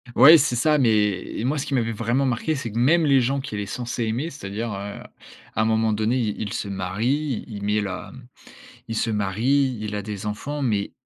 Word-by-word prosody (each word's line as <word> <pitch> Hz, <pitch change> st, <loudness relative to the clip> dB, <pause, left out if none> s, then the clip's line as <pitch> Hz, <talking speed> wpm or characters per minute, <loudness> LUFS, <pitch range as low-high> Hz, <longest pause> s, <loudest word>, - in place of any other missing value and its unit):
Ouais, 160 Hz, +4 st, +9 dB
c'est 145 Hz, -5 st, +1 dB
ça, 150 Hz, +6 st, +3 dB
mais 105 Hz, -7 st, +1 dB
moi, 140 Hz, +5 st, 0 dB
ce 135 Hz, -, -2 dB
qui -, -, -4 dB
m'avait 115 Hz, -3 st, +1 dB
vraiment 115 Hz, +5 st, 0 dB
marqué, 130 Hz, +5 st, 0 dB
c'est 130 Hz, -6 st, -4 dB
que 115 Hz, -, -2 dB
même 160 Hz, +7 st, +4 dB
les 140 Hz, -2 st, +5 dB
gens 135 Hz, +3 st, 0 dB
qu'il 110 Hz, -6 st, -5 dB
est 100 Hz, -, -3 dB
censé 120 Hz, +3 st, -4 dB
aimer, 120 Hz, +9 st, -2 dB
c'est-à-dire, 115 Hz, -5 st, -5 dB
heu, 100 Hz, +1 st, -6 dB, 0.5 s
à -, -, 0 dB
un -, -, +2 dB
moment 110 Hz, 0 st, +2 dB
donné, 110 Hz, +3 st, +1 dB
il 110 Hz, -5 st, -1 dB
il 105 Hz, -2 st, -3 dB
se 100 Hz, -, -3 dB
marie, 115 Hz, +8 st, -1 dB
il 115 Hz, -, -9 dB
il 100 Hz, -, -7 dB
met 105 Hz, +1 st, +1 dB
la 100 Hz, -2 st, -5 dB, 0.8 s
il 115 Hz, -, -2 dB
se 115 Hz, -, 0 dB
marie, 120 Hz, +6 st, +1 dB
il 105 Hz, -1 st, -4 dB
a 105 Hz, -, -2 dB
des 105 Hz, 0 st, -6 dB
enfants 140 Hz, +8 st, -4 dB
mais 105 Hz, -6 st, 0 dB
115 Hz, 220 wpm, -23 LUFS, 105-135 Hz, 0.8 s, Ouais